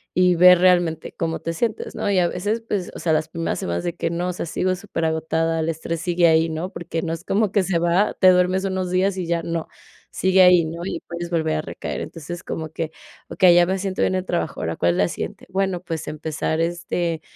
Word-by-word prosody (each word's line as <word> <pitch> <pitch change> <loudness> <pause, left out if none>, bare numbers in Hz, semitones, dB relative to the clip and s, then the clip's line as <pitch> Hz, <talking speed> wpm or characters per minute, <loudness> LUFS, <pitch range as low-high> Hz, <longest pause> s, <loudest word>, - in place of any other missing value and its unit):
y 180 0 +4
ver 180 +1 +8
realmente 175 -3 +2
cómo 165 -1 -2
te 165 - -4
sientes, 220 +6 -3
¿no? - - -2
Y 195 - +2
a 175 - +3
veces, 205 +6 -2
pues, 195 -5 -2
o - - -7
sea, 160 - +1
las 155 0 0
primeras 165 0 -3
semanas 85 0 -2
de 170 - -2
que 165 - -2
no, 175 +2 -2
o - - -2
sea, 175 - -4
sigo 185 +3 0
súper 185 -3 -4
agotada, 160 +1 0
el 160 - -1
estrés 165 +1 -3
sigue 175 0 +3
ahí, 160 0 +3
¿no? 160 +4 -4
Porque 165 -1 -4
no 165 - -2
es 165 0 -6
como 205 +1 +1
que 200 -1 +2
se 180 -2 0
va, 175 +4 +2
te 185 - +6
duermes 185 +1 +2
unos 190 -1 -2
días 185 +1 +1
y 180 -2 -3
ya 170 0 0
no, 165 -1 -3 0.4
sigue 190 0 +3
ahí, 180 -2 +6
¿no? 165 +2 -6
Y - - -3
puedes 170 0 -5
volver 160 -2 0
a - - -1
recaer. - - -6
Entonces, 170 +2 -7
como 160 -1 -5
que, 160 0 -4 0.4
okey, 185 -3 +5
ya 175 0 +6
me 190 +1 0
siento 190 0 -3
bien 185 - +2
el 185 0 -2
trabajo. 170 -5 -2
Ahora, 80 +1 -2
¿cuál 85 - +2
es - - -3
la 90 - +3
siguiente? - - -6
Bueno, 190 -1 -1
pues, 165 -3 -5
empezar, 155 +1 -3
este, 170 -1 -2
170 Hz, 240 wpm, -22 LUFS, 160-185 Hz, 0.4 s, ver